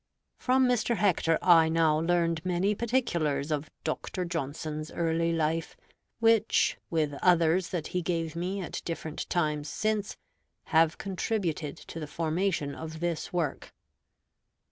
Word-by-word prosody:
From 260 0 +3
Mr. 240 -1 +1
Hector 175 -5 +2
I 165 -3 +6
now 160 -2 +3
learned 165 -1 +1
many 185 +3 +1
particulars 170 - 0
of 150 0 -2
Dr. 180 +3 -3
Johnson's 155 -1 -4
early 165 0 0
life, 165 0 -1 0.4
which, 225 -1 +3
with 155 -3 0
others 175 0 +3
that 170 -4 -3
he 180 - -1
gave 165 -1 -2
me 185 +4 -2
at 175 - -5
different 160 -2 -5
times 150 -3 0
since, 215 -1 -1 0.6
have 160 0 +4
contributed 180 -6 -2
to 165 - -9
the 155 - -5
formation 165 -1 -1
of 160 +1 -7
this 170 -1 -2
work. 170 -6 -2
165 Hz, 130 wpm, -29 LUFS, 155-185 Hz, 0.6 s, I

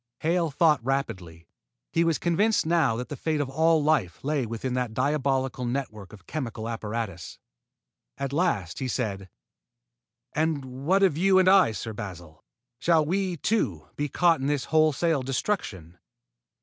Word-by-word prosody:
Hale 170 +1 +1
thought 150 -2 +3
rapidly. 95 - -3 0.5
He 165 - +2
was 165 -2 +1
convinced 200 +5 +1
now 160 -8 +2
that 125 +2 -5
the 145 - -4
fate 155 +2 -1
of 140 -2 -2
all 160 +1 +3
life 120 - 0
lay 140 -3 0
within 115 +3 -4
that 125 -3 -2
diabolical 135 -1 0
network 120 -6 -4
of 100 -4 -14
chemical 115 -7 -5
apparatus. 110 -6 -5 0.8
At 140 0 -4
last 145 - 0
he 130 - -2
said: 100 -6 -3 1.0
"And 155 -3 0 0.2
what 195 +3 +4
of 165 -5 +3
you 190 +1 +4
and 185 -1 +4
I, 190 -10 +6
Sir 110 +1 -5
Basil? 85 -7 -9 0.4
Shall 160 +3 +3
we, 185 +1 -1
too, 140 - -1
be 145 0 -2
caught 170 +1 +3
in 135 - -2
this 145 -2 0
wholesale 155 -1 +3
destruction?" 125 - -3
135 Hz, 150 wpm, -26 LUFS, 110-165 Hz, 1.0 s, I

